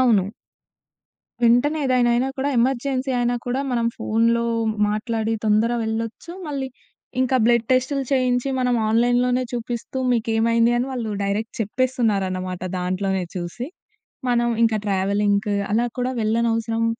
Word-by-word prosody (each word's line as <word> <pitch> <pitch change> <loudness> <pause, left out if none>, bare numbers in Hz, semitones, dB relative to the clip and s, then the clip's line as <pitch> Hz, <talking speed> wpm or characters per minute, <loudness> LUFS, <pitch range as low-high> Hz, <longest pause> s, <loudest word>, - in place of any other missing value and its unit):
అవును. 210 -7 +3 1.1
వెంటనే 245 +7 +4
ఏదైనా 250 -2 +3
అయినా 255 +3 +1
కూడా, 275 +2 0
ఎమర్జెన్సీ 260 +2 0
అయినా 245 0 +1
కూడా, 255 +2 0
మనం 235 -1 +1
ఫోన్‌లో 230 +1 +1 0.5
మాట్లాడి 220 +1 -1
తొందర 215 +2 +3
వెళ్ళొచ్చు. 225 +7 -4 0.2
మళ్ళీ 275 -3 -3 0.5
ఇంకా 260 0 +2
బ్లడ్ 235 -1 +3
టెస్టులు 265 +2 +1
చేయించి, 255 0 +1
మనం 250 -1 +2
ఆన్‌లైన్‌లోనే 245 +2 +2
చూపిస్తూ, 240 +1 -4
మీకేమైంది 230 0 +2
అని 250 - -1
వాళ్ళు 230 -4 -3
డైరెక్ట్ 205 +3 -2
చెప్పేస్తున్నారనమాట 200 -6 -1 0.2
దాంట్లోనే 185 +1 -1
చూసి. 180 - -5 0.6
మనం 240 0 +2 0.2
ఇంక 220 -1 +1
ట్రావెలింగ్‌కు, 200 +1 +1 0.2
అలా 240 +2 +2
కూడా 250 +1 -1
వెళ్ళనవసరం 225 +1 +1
235 Hz, 120 wpm, -22 LUFS, 215-250 Hz, 1.1 s, వెంటనే